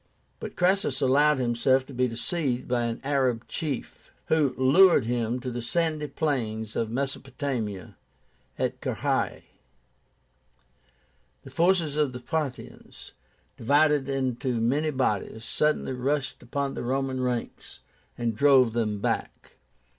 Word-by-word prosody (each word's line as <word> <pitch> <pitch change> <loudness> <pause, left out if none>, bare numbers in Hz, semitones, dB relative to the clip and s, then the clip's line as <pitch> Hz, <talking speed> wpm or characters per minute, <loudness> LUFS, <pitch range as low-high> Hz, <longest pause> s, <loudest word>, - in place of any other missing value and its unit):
But - - -7
Crassus 180 -7 +1
allowed 145 +2 +4
himself 130 +1 +2
to 140 - -11
be 125 0 +1
deceived 125 +2 -2
by 120 -1 0
an 115 -1 -3
Arab 130 -4 0
chief, 150 -5 -5 0.2
who 150 -5 +2
lured 165 +3 +6
him 120 0 -1
to 125 0 -4
the 120 0 -4
sandy 155 +4 -1
plains 110 -9 -2
of 115 - -1
Mesopotamia 130 -5 -4 0.6
at - - -2
Carrhae. - - -1 2.0
The - - -12
forces 170 -4 +2
of 145 -4 +1
the 125 - -6
Parthians, 145 0 -5 0.5
divided 145 +2 +3
into 130 -2 -1
many 140 +7 +1
bodies, 115 -4 -1
suddenly 150 -2 0
rushed 135 +2 -2
upon 140 +3 -3
the - - -5
Roman 130 +1 -1
ranks, 125 -2 -4 0.4
and 115 -2 -1
drove 130 -2 +5
them 105 -3 -1
back. - - -3
130 Hz, 125 wpm, -26 LUFS, 120-145 Hz, 2.0 s, lured